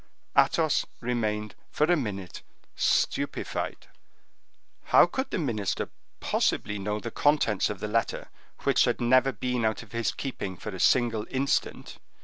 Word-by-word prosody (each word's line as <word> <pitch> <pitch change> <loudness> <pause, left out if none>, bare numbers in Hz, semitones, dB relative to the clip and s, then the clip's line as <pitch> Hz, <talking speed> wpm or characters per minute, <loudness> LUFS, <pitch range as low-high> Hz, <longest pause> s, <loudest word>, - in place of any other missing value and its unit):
Athos - - +3 0.2
remained 105 -3 -2 0.2
for - - 0
a 175 +3 +4
minute 100 - -4 0.3
stupefied. - - -1 1.0
How - - +7
could 260 +9 -3
the - - -2
minister 110 - -2 0.3
possibly 105 -1 0
know 105 +2 -2
the 115 +1 -6
contents 145 -9 +2
of 105 - -5
the 105 - -3
letter, 115 +2 -1 0.3
which - - +4
had - - 0
never 130 +2 +4
been 125 +2 -2
out 110 +1 0
of 110 - -18
his 115 -1 0
keeping 100 -9 -5
for 105 - -6
a 95 -3 -7
single 115 -2 +2
instant? 135 +1 -1
115 Hz, 140 wpm, -27 LUFS, 105-130 Hz, 1.0 s, How